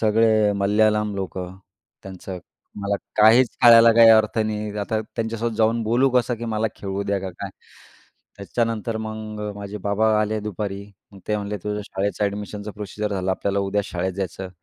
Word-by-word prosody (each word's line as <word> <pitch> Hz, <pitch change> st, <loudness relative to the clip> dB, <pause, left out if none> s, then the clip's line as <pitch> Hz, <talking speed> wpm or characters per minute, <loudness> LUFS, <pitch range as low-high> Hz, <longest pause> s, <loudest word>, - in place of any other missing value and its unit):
सगळे 110 Hz, -1 st, +3 dB
मल्याळम 105 Hz, +1 st, +2 dB
लोकं. 95 Hz, -1 st, -5 dB, 0.5 s
त्यांचं 95 Hz, -1 st, -8 dB, 0.4 s
मला 100 Hz, 0 st, 0 dB, 0.2 s
काहीच 115 Hz, +3 st, +6 dB
कळायला 115 Hz, -1 st, +8 dB
काही 115 Hz, 0 st, +7 dB
अर्थ 110 Hz, 0 st, +4 dB
नाही. 105 Hz, -1 st, -2 dB
आता 110 Hz, +2 st, -1 dB, 0.2 s
त्यांच्यासोबत 115 Hz, 0 st, -2 dB
जाऊन 115 Hz, +1 st, +2 dB
बोलू 120 Hz, +5 st, +2 dB
कसं, 125 Hz, -1 st, +1 dB
की 120 Hz, -, -7 dB
"मला 110 Hz, -1 st, -1 dB
खेळू 100 Hz, 0 st, -4 dB
द्या," 100 Hz, -1 st, 0 dB
का 95 Hz, -1 st, -5 dB
काय. 100 Hz, +2 st, -7 dB, 0.9 s
त्याच्यानंतर 115 Hz, +2 st, -2 dB
मग 110 Hz, -1 st, -6 dB, 0.2 s
माझे 100 Hz, +1 st, -7 dB
बाबा 105 Hz, +2 st, +1 dB
आले 110 Hz, 0 st, -1 dB
दुपारी. 100 Hz, -1 st, -5 dB, 0.4 s
ते 105 Hz, -, +1 dB
म्हणले, 105 Hz, 0 st, -4 dB
"तुझं 105 Hz, 0 st, -2 dB
शाळेच्या 100 Hz, +1 st, -1 dB
अ‍ॅडमिशनचा 105 Hz, +1 st, -5 dB
प्रोसिजर 105 Hz, +1 st, -5 dB
झालं. 95 Hz, 0 st, -1 dB
आपल्याला 100 Hz, +1 st, -1 dB
उद्या 100 Hz, +1 st, 0 dB
शाळेत 95 Hz, -1 st, -3 dB
जायचं." 95 Hz, -1 st, -5 dB
105 Hz, 155 wpm, -22 LUFS, 100-110 Hz, 0.9 s, कळायला